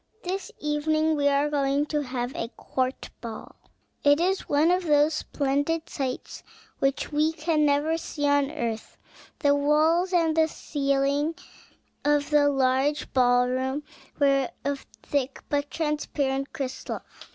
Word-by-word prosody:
This 375 +2 -4
evening 310 +1 +1
we 285 -1 +2
are 285 +1 +3
going 285 0 +1
to 300 - +2
have 250 -2 -3
a 230 - -3
court 260 0 -3
ball." 225 -2 -8 0.5
It 285 +1 +5
is 375 +3 0
one 300 +4 +4
of 365 +1 +2
those 295 +1 +4
splendid 285 +4 -1
sights 260 -3 -4 0.4
which 275 +2 0
we 305 +2 +2
can 310 -1 +1
never 295 +3 +2
see 290 -2 -2
on 285 -1 +3
earth. 230 -6 -4 0.4
The 285 -2 +3
walls 310 +5 +3
and 330 -3 +2
the 320 0 +4
ceiling 280 +1 0 0.7
of 295 0 +2
the 290 -1 +5
large 270 +2 +1
ball 245 -1 +4
room 260 +3 -1 0.4
were 275 -2 +3 0.2
of 280 -1 -3 0.2
thick, 275 -2 -2
but 290 0 0
transparent 290 -3 -1
crystal. 260 -1 -5
285 Hz, 140 wpm, -26 LUFS, 275-310 Hz, 0.7 s, It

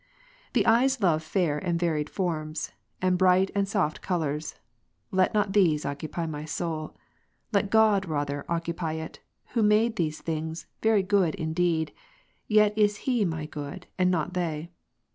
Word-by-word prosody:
The - - +3
eyes 255 +3 +4
love 170 -6 +3
fair 160 -2 0
and 170 -1 -1
varied 155 -4 0
forms, 155 -4 -3 0.3
and 180 -1 +2
bright 185 +1 +4
and 200 -1 +1
soft 190 -7 0
colours. 155 -4 -2 0.6
Let 185 +2 +2
not 205 -2 +1
these 170 -7 +3
occupy 155 +4 -3
my 150 -2 -5
soul; 155 0 -4 0.6
let 200 -1 +1
God 215 -3 +4
rather 145 -2 -2
occupy 170 -1 -2
it, 160 0 -6 0.3
who 240 - -1
Gen. - - +4
l, - - +5
made 220 +2 +3
these 155 -3 -1
things, 160 0 -4 0.2
very 220 -3 +3
good 190 -4 +2
indeed, 160 -1 0 0.5
yet 210 -1 +4
is 210 -1 +1
He 245 -6 +2
my 160 -3 -2
good, 150 +4 -7
not 180 -1 +1
they. 170 -2 -3
175 Hz, 155 wpm, -27 LUFS, 155-200 Hz, 0.6 s, l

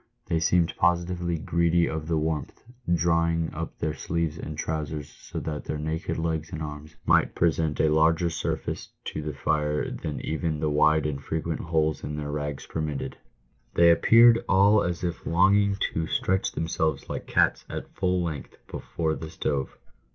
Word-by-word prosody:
They 80 - 0
seemed 85 +1 +2
positively 85 0 +1
greedy 85 +1 +2
of 80 -1 -4
the 80 -1 +1
warmth, 75 -2 -3 0.3
drawing 85 -1 +2
up 80 +1 -5
their 75 - -1
sleeves 80 0 -2
and 75 -1 -6
trousers 75 -2 -3
so - - -8
that 75 -2 -4
their 75 - -3
naked 80 +2 -3
legs 80 -1 -2
and 80 - -5
arms 75 +1 -7
might - - +3
present 80 -2 +1
a 80 - +4
larger 80 +2 +3
surface - - -3 0.2
to - - -4
the 75 -1 -5
fire 75 +2 0
than 75 -2 -4
even 80 0 -2
the 75 0 0
wide 75 +1 +3
and 70 -2 -2
frequent 80 +1 -2
holes 80 -2 0
in 75 - -4
their 75 -1 -4
rags 75 -1 -4
permitted. 75 -3 -3 0.6
They 85 0 +7
appeared 115 +6 +6
all 100 +2 +5
as 90 0 -3
if 85 -2 -3
longing 100 +4 +4 0.2
to 80 -1 -1
stretch 95 +3 0
themselves 80 -3 -1
like - - -5
cats - - +2
at - - -6
full 90 -1 +1
length 80 -5 -5
before 80 -2 -3
the 80 0 -6
stove. 70 -3 -2
80 Hz, 165 wpm, -26 LUFS, 75-85 Hz, 0.6 s, They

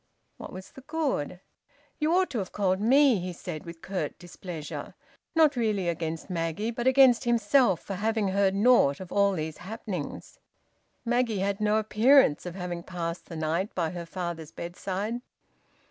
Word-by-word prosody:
"What - - -9
was 185 +1 -9
the 265 - -12
good?" 275 - -2 0.6
"You 305 +1 +1
ought 370 0 +2
to 240 - -1
have 190 - -4
called 190 -1 0
me," 260 0 +5
he 180 +1 -4
said 165 -2 -7
with 170 -1 -10
curt 190 -1 -3
displeasure, 175 -3 -7 0.4
not 310 -3 +5
really 215 -6 0
against 165 -1 -3
Maggie, 175 +4 -2
but 240 +2 -2
against 260 -3 +6
himself 235 - +3
for 200 - -6
having 215 +1 0
heard 195 0 +2
naught 200 - +4
of 185 -2 -9
all 200 -1 +3
these 155 -3 -4
happenings. 190 -5 -6 0.7
Maggie 240 -2 +1
had 200 +1 -1
no 210 0 +3
appearance 220 - +4
of 175 - -6
having 180 -2 -4
passed 170 -1 -5
the 165 - -8
night 165 +6 -1
by 165 -3 0
her 175 -1 -6
father's 170 -3 -5
bedside. 195 +6 -4
195 Hz, 160 wpm, -28 LUFS, 170-230 Hz, 0.7 s, against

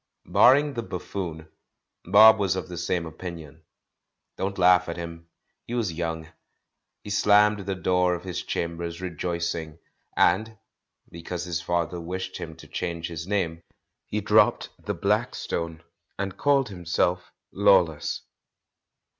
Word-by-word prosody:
Barring 145 +3 +5
the 120 - -3
"buffoon," 90 -5 -6 0.6
Bob 110 +4 +8
was 95 -3 +1
of 95 -1 -4
the 90 -1 -7
same 85 0 -1
opinion. 80 -2 -9 0.7
Don't 100 +1 -3
laugh 90 -1 +5
at 85 - -4
him, 85 -1 -7 0.4
he 120 - -3
was 110 -8 -1
young. 80 -1 -3 0.8
He 105 - -7
slammed 105 +1 +4
the 95 - -1
door 90 -1 +2
of 85 - -8
his 90 -2 -4
chambers 85 0 -4
rejoicing, 85 -2 -3 0.4
and 110 0 +2 0.3
— - - -37
because 85 +1 -5
his 85 -1 -3
father 85 0 -1
wished 95 +2 -5
him 80 -1 -7
to 80 - -14
change 85 -2 -4
his 85 0 -6
name 85 -5 -1 0.2
— - - -57
he - - -1
dropped - - +3
the - - -3
"Blackstone" 85 -1 -2 0.3
and 95 -1 -3
called 140 -4 +2
himself 90 -1 -1 0.2
"Lawless." 95 -6 +2
90 Hz, 140 wpm, -26 LUFS, 85-95 Hz, 0.8 s, Bob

